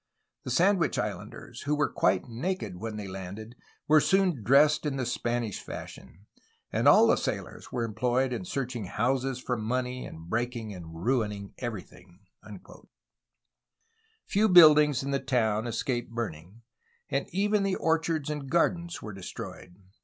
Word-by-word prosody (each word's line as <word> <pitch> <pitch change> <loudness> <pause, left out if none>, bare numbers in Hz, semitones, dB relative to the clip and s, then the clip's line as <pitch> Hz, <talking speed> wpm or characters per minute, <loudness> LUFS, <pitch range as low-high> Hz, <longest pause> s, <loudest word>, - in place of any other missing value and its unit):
The - - -4
Sandwich 175 +5 +2
Islanders, 110 +3 -5
who 150 - +2
were 150 0 +2
quite 95 0 +1
naked 120 - -3
when 110 +3 -5
they 105 -2 -5
landed, 95 +5 -8 0.3
were 155 0 +6
soon 190 -9 +2
dressed 140 +7 +4
in 145 -3 -2
the 130 -2 -2
Spanish 120 -3 -2
fashion; 95 +5 -10 0.5
and - - +1
all - - +8
the - - +5
sailors - - -5
were 120 - -1
employed 125 +3 0
in 125 - -4
searching 125 - -4
houses 130 +6 0
for 125 -1 -2
money 125 +3 -2
and 80 +1 -11
breaking 115 0 -2
and 80 -1 -9
ruining 105 -6 -1
everything." 95 -5 -8 2.0
Few 215 +2 +2
buildings 150 -6 +7
in 140 - -3
the 140 - +1
town 120 -4 0
escaped 120 +1 -2
burning, 110 -2 -6 0.5
and 140 +1 -1
even 205 +3 +1
the 195 -1 0
orchards 160 -2 0
and 145 -3 -5
gardens 170 +1 0
were 105 - -6
destroyed. 90 -1 -8
125 Hz, 145 wpm, -28 LUFS, 105-150 Hz, 2.0 s, all